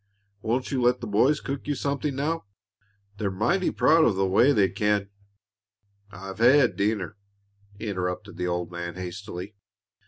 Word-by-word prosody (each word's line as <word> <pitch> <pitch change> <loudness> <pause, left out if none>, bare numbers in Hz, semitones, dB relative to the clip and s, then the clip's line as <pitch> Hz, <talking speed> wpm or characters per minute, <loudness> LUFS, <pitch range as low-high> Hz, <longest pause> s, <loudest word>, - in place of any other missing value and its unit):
Won't 120 +5 -1
you 135 -2 0
let 125 +1 +3
the - - -6
boys 125 +8 +3
cook 140 +1 -5
you 145 - 0
something 140 +1 -2
now? 155 +2 -2 0.7
They're 100 -1 -1
mighty 120 - +1
proud 160 0 +4
of 110 - +3
the 95 0 +1
way 100 +9 +4
they 105 -7 +4
can 100 +1 0 0.5
" 105 -2 -51 0.2
"I've 95 +1 -9
had 125 +2 +5
dinner," 105 -1 -1 0.6
interrupted 90 -5 -4
the 90 0 -2
old 90 0 -2
man, 85 0 -5
hastily. 95 +1 -7
105 Hz, 155 wpm, -26 LUFS, 95-130 Hz, 0.7 s, had